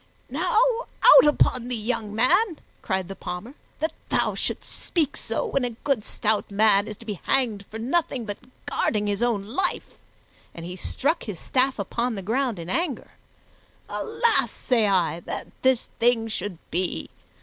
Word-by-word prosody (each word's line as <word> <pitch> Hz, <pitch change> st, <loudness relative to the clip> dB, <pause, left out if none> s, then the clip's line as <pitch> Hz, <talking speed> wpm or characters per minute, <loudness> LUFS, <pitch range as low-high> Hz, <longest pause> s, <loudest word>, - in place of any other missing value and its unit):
"Now, 450 Hz, -, 0 dB, 0.5 s
out -, -, +10 dB
upon 255 Hz, -4 st, +2 dB
thee, 250 Hz, -, -2 dB
young 220 Hz, -2 st, -3 dB
man," 340 Hz, -, +3 dB, 0.2 s
cried 190 Hz, -3 st, -1 dB
the 195 Hz, -, -7 dB
Palmer, 190 Hz, +7 st, -6 dB, 0.3 s
"that 315 Hz, -, 0 dB, 0.2 s
thou -, -, +1 dB
shouldst -, -, -2 dB, 0.2 s
speak 320 Hz, -6 st, 0 dB
so -, -, -2 dB
when 275 Hz, -, 0 dB
a 240 Hz, -2 st, -3 dB
good 270 Hz, -7 st, +1 dB
stout 215 Hz, 0 st, -1 dB
man 205 Hz, 0 st, +4 dB
is 215 Hz, -2 st, -6 dB
to 230 Hz, -, -14 dB
be 210 Hz, -4 st, -5 dB
hanged 225 Hz, -7 st, +1 dB
for 220 Hz, -, -7 dB
nothing 260 Hz, 0 st, -1 dB
but 205 Hz, -2 st, -5 dB, 0.3 s
guarding 210 Hz, -2 st, 0 dB
his 205 Hz, 0 st, -1 dB
own 230 Hz, -5 st, +1 dB
life!" 355 Hz, -, -2 dB, 0.6 s
And 170 Hz, -, -7 dB
he 180 Hz, +1 st, -6 dB
struck 300 Hz, -, -1 dB
his 205 Hz, -7 st, -6 dB
staff 260 Hz, +1 st, +1 dB
upon 235 Hz, +4 st, -2 dB
the 195 Hz, -, -5 dB
ground 240 Hz, +2 st, 0 dB
in 170 Hz, -1 st, -7 dB
anger. 310 Hz, -, -2 dB, 0.8 s
"Alas, 455 Hz, +1 st, +2 dB
say 230 Hz, -4 st, +1 dB
I, 175 Hz, -5 st, +2 dB
that -, -, -6 dB
this 260 Hz, -2 st, +2 dB
thing 230 Hz, -1 st, +3 dB
should 205 Hz, -4 st, -4 dB
be! 180 Hz, +2 st, -2 dB
225 Hz, 165 wpm, -25 LUFS, 200-265 Hz, 0.8 s, out